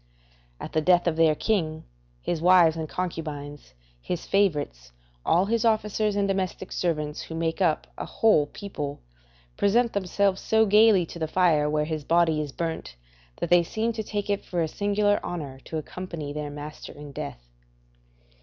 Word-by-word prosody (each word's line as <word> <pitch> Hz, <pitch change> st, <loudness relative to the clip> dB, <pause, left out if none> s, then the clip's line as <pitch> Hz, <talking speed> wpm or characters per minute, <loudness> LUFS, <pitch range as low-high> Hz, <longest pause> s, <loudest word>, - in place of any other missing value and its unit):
At -, -, -7 dB
the 155 Hz, -, +2 dB
death 175 Hz, +2 st, +4 dB
of 170 Hz, -2 st, +1 dB
their 160 Hz, -1 st, +4 dB
king, 160 Hz, -6 st, -1 dB, 0.4 s
his 165 Hz, -2 st, -2 dB
wives 175 Hz, -2 st, +6 dB
and 160 Hz, -2 st, -4 dB
concubines, 150 Hz, -, -5 dB, 0.3 s
his 175 Hz, -, -4 dB
favourites, 145 Hz, -, 0 dB, 0.3 s
all 175 Hz, +3 st, +3 dB
his 230 Hz, +2 st, 0 dB
officers, 215 Hz, -2 st, +1 dB
and 200 Hz, -1 st, +1 dB
domestic 190 Hz, -1 st, -2 dB
servants, 150 Hz, -4 st, -2 dB
who 160 Hz, -, -7 dB
make 165 Hz, +2 st, -2 dB
up 165 Hz, -4 st, +2 dB
a -, -, -3 dB
whole 210 Hz, -10 st, +3 dB
people, 145 Hz, -7 st, -6 dB, 0.6 s
present 235 Hz, +4 st, +2 dB
themselves 195 Hz, 0 st, +1 dB
so 220 Hz, 0 st, +3 dB
gaily 210 Hz, -3 st, +5 dB
to 170 Hz, -, -10 dB
the 160 Hz, -, -1 dB
fire 160 Hz, -4 st, +3 dB
where 150 Hz, 0 st, +1 dB
his 155 Hz, -1 st, -3 dB
body 165 Hz, -1 st, +3 dB
is 145 Hz, -2 st, -5 dB
burnt, 165 Hz, -, -4 dB, 0.4 s
that 170 Hz, -, -4 dB
they 175 Hz, 0 st, +7 dB
seem 220 Hz, +7 st, -2 dB
to 220 Hz, -, -3 dB
take 205 Hz, -1 st, -3 dB
it 200 Hz, -1 st, -1 dB
for 175 Hz, -2 st, -1 dB
a -, -, 0 dB
singular 205 Hz, +3 st, +1 dB
honour 145 Hz, -7 st, -5 dB
to 160 Hz, -, -4 dB
accompany 155 Hz, -2 st, -6 dB
their 150 Hz, 0 st, -4 dB
master 145 Hz, +1 st, -8 dB
in 145 Hz, -1 st, -10 dB
death. -, -, -7 dB
170 Hz, 170 wpm, -26 LUFS, 150-200 Hz, 0.6 s, they